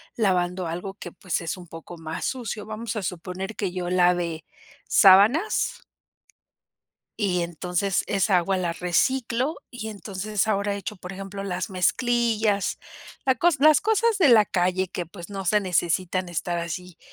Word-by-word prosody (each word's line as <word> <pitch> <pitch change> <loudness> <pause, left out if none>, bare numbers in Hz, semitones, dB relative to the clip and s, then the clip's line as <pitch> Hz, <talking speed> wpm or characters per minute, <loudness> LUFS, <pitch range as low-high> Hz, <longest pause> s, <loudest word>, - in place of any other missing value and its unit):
lavando 180 -4 0
algo 180 +4 -5
que 175 -4 -9
pues 185 -1 -3
es 165 +2 -4
un 175 -1 -11
poco 165 +2 -10
más 160 0 -6
sucio. 225 -5 -4
Vamos 220 0 -5
a 215 - -2
suponer 185 +3 -5
que 195 -4 -2
yo 180 -1 -3
lave 175 -3 +1 0.4
sábanas 265 - +5 1.4
y 185 -4 +1
entonces 180 +3 -1
esa 195 -1 +2
agua 190 +2 +1
la 175 -2 -1
reciclo 245 - 0 0.2
y 225 -3 -6
entonces 205 0 -3
ahora 200 -1 0
echo 200 +1 -6
por 180 +1 -8
ejemplo 195 +1 -7
las 185 -1 -3
mezclillas, 220 0 +1 0.5
la 260 - +4
cos 330 +4 +2
las 305 +1 +6
cosas 440 0 +2
de 325 -7 +6
la 220 -3 +7
calle 185 0 0
que 175 -1 -5
pues 175 +1 -10
no 195 -1 -4
se 210 +4 +3
necesitan 185 0 0
estar 175 0 -2
así 175 +1 -6
190 Hz, 155 wpm, -25 LUFS, 180-215 Hz, 1.4 s, la